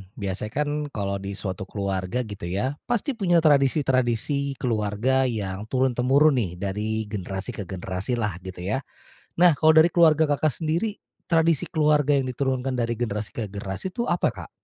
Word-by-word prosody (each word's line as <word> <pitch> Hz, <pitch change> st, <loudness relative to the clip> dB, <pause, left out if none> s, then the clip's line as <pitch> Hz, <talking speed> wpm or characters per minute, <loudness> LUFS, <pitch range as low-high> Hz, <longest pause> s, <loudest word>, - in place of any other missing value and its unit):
Biasanya 100 Hz, +1 st, -4 dB
kan 145 Hz, -, -4 dB, 0.3 s
kalau 100 Hz, -1 st, -2 dB
di 100 Hz, 0 st, -5 dB
suatu 95 Hz, -2 st, -5 dB
keluarga 100 Hz, +4 st, -2 dB
gitu 100 Hz, -5 st, -7 dB
ya, 125 Hz, +11 st, -2 dB
pasti 240 Hz, +4 st, 0 dB
punya 175 Hz, -8 st, +2 dB
tradisi-tradisi 140 Hz, -2 st, +2 dB
keluarga 120 Hz, +3 st, +1 dB
yang 105 Hz, -3 st, -4 dB
turun-temurun 130 Hz, +3 st, +3 dB
nih, 95 Hz, -7 st, -1 dB
dari 105 Hz, +4 st, -2 dB
generasi 95 Hz, +2 st, -4 dB
ke 100 Hz, -6 st, -7 dB
generasi 95 Hz, +5 st, -3 dB
lah, 105 Hz, -7 st, -2 dB
gitu 90 Hz, -1 st, -8 dB
ya. 105 Hz, +8 st, -1 dB, 0.6 s
Nah, 175 Hz, -5 st, +6 dB
kalau 155 Hz, +2 st, +5 dB
dari 160 Hz, +2 st, +6 dB
keluarga 160 Hz, -3 st, +4 dB
Kakak 145 Hz, +1 st, 0 dB
sendiri, 170 Hz, +7 st, 0 dB, 0.3 s
tradisi 165 Hz, -3 st, +2 dB
keluarga 150 Hz, -2 st, +3 dB
yang 135 Hz, -2 st, +1 dB
diturunkan 130 Hz, 0 st, -1 dB
dari 120 Hz, -1 st, 0 dB
generasi 110 Hz, -3 st, -3 dB
ke 115 Hz, -, -3 dB
generasi 100 Hz, -, -5 dB
itu 235 Hz, +6 st, -3 dB
apa, 175 Hz, -, +1 dB
Kak? 95 Hz, -8 st, -9 dB
125 Hz, 160 wpm, -25 LUFS, 100-150 Hz, 0.6 s, Nah